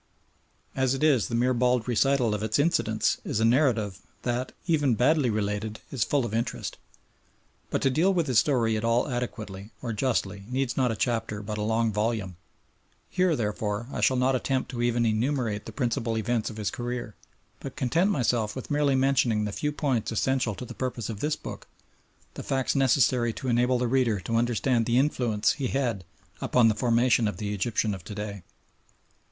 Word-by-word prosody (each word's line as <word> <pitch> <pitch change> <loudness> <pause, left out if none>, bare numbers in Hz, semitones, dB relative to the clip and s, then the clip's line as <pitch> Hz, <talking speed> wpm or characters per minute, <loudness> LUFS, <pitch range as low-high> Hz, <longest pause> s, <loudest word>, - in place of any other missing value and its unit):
As 130 0 +1
it 135 - -3
is, 140 -8 +4
the 115 - -3
mere 125 +2 +2
bald 125 -1 +1
recital 125 -1 +2
of 105 - -2
its 110 0 0
incidents 160 +4 +1
is - - -2
a 110 - +3
narrative 115 -6 +2 0.2
that, 125 +1 -2
even 145 -8 +2
badly 135 +2 +3
related, 105 0 -2
is 130 -6 0
full 140 +1 +1
of 110 - -5
interest. 115 +1 -3 0.9
But - - -1
to 135 - +3
deal 170 +9 +3
with 175 -4 +1
his 125 -7 +4
story 115 -5 +2
at 110 - -2
all 115 +1 +2
adequately 110 -6 -5
or 120 -2 -2
justly 105 -4 -1
needs 130 0 -1
not 130 -3 +2
a - - -2
chapter 110 -2 -2
but 105 +1 -4
a - - -1
long 110 +1 +1
volume. 105 -3 -1 0.8
Here, 180 -3 +2
therefore, 105 0 -2
I - - -3
shall 130 - +3
not 130 +1 +2
attempt 130 +1 -1
to 120 -2 -4
even 120 0 +1
enumerate 115 -1 0
the - - -6
principal 120 -3 -1
events 110 +1 -1
of 110 - -9
his 105 -2 -2
career, 120 -2 -4 0.5
but 135 - -8
content 160 - +1
myself 120 - 0
with 130 +3 -7
merely 145 -2 +2
mentioning 130 -5 +2
the 105 - -3
few 150 +8 -2
points 135 -7 -1
essential 120 -1 0
to 125 - -7
the - - -8
purpose 125 -4 -4
of 110 -3 -5
this 150 +5 0
book, - - -9 0.7
the - - -7
facts 135 -1 0
necessary 125 -3 +3
to 130 +2 -4
enable 125 +1 +3
the 125 0 0
reader 120 -4 +2
to 115 +6 -3
understand 120 0 +1
the 120 0 +2
influence 120 -6 +2
he 135 -4 -2
had 120 -9 -1 0.4
upon 120 -3 +4
the - - +2
formation 120 0 +2
of 105 - -3
the 105 0 -3
Egyptian 105 +1 0
of 95 -3 -8
to 105 - -7
day. 105 -1 -5
120 Hz, 190 wpm, -27 LUFS, 110-130 Hz, 0.9 s, is